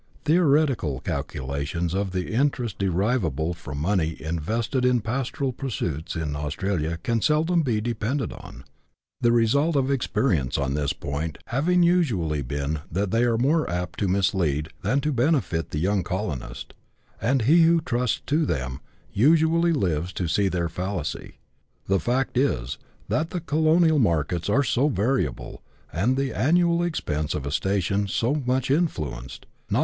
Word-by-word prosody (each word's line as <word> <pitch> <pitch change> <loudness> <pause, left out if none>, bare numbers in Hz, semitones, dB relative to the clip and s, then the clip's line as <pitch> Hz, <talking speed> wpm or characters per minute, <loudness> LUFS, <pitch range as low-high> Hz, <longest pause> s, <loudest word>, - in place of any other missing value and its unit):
Theoretical 145 - +2
calculations 70 +6 -3
of 100 0 -1
the 90 +2 -3
interest 125 -4 0
derivable 90 - 0
from 70 -5 -8
money 80 0 0
invested 110 - -2
in 125 -2 +3
pastoral 130 +4 -2
pursuits 90 - -4
in 75 -3 -2
Australia 80 +2 -2
can 115 -2 0
seldom 160 +5 +2
be 120 -8 0
depended 120 +3 -2
on, - - -11 0.6
the 120 - +3
result 140 +8 +3
of 135 0 +2
experience 115 - 0
on 70 -1 -1
this 70 -1 0
point 75 +2 -4
having 175 +9 +2
usually 115 - +2
been 70 +3 -3
that 95 +3 -1
they 115 - +2
are 115 -2 +2
more 150 +7 +2
apt 90 0 -3
to 100 - +1
mislead 90 -6 +1
than 130 +9 +1
to 150 - 0
benefit 125 - +1
the - - -4
young 95 +5 +1
colonist, 75 - -5 0.5
and 125 +1 +2
he 160 +9 +5
who 165 +1 +5
trusts 125 -7 -1
to 155 +3 +1
them 65 - -2 0.3
usually 160 +7 +4
lives 90 - 0
to 90 - -2
see 100 +5 +2
their 90 -2 -1
fallacy. 90 -1 -4 0.5
The 95 0 +2
fact 125 +3 0
is, 65 - -1 0.3
that 160 +1 0
the 180 - -3
colonial 160 0 +3
markets 85 - 0
are 135 +7 +3
so 135 +1 +2
variable, 105 - -1 0.3
and 120 +10 +1
the 135 -3 -1
annual 170 - +3
expenses 80 - -2
of 75 -3 -4
a 70 - -3
station 100 +4 0
so 125 +9 0
much 130 +1 +1
influenced, 75 - -2 0.2
not - - 0
CHAP. - - +3
105 Hz, 155 wpm, -25 LUFS, -, 0.6 s, he